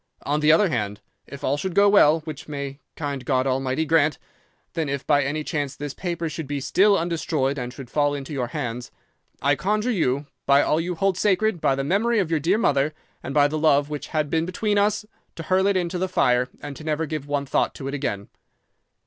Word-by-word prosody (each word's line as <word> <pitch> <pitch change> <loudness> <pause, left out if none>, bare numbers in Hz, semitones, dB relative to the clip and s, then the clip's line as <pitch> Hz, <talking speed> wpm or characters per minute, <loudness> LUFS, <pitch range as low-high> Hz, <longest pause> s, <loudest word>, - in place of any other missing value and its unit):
On 145 +1 0
the 150 0 +5
other 180 +5 +4
hand, 105 -7 -2 0.3
if 140 0 -10
all 140 +1 +1
should 185 +3 -4
go 200 0 +6
well 165 -6 +5
(which 155 0 -8
may 140 -2 -5 0.2
kind 140 -4 -4
God 130 0 +1
Almighty 135 +3 0
grant!), 155 -2 +3 0.6
then 160 -3 -2
if 140 -1 -3
by 145 -2 +3
any 150 +3 -2
chance 145 -3 -3
this 145 -1 -5
paper 170 -1 -3
should 155 -1 -5
be 145 0 -2
still 200 +8 +3
undestroyed 155 -5 -1
and 125 0 -4
should 135 0 -10
fall 145 +2 +1
into 140 +1 -6
your 130 -4 -1
hands, 125 -4 -4 0.5
I 140 - +4
conjure 210 - 0
you, 145 - 0 0.2
by 140 +1 +5
all 155 +2 +1
you 175 +1 -3
hold 190 +1 0
sacred, 210 -2 +1
by 135 - +2
the 135 - -2
memory 215 +10 +1
of 185 -6 0
your 160 - +2
dear 175 +8 +2
mother, 150 -8 +1 0.3
and - - -6
by 145 0 +4
the 155 +1 -3
love 145 -1 +3
which 145 -1 -5
had 155 -2 -1
been 165 +1 +1
between 205 +3 0
us, 210 +1 +1 0.3
to 165 - -6
hurl 190 +3 +2
it 200 -1 +2
into 180 0 -2
the 185 +1 -1
fire 125 -7 +2
and 145 - -6
to - - -10
never 155 +1 -1
give 155 -2 -5
one 145 -1 -1
thought - - 0
to 135 - -6
it 140 - -4
again. 100 -8 -3
150 Hz, 225 wpm, -24 LUFS, 140-175 Hz, 0.6 s, go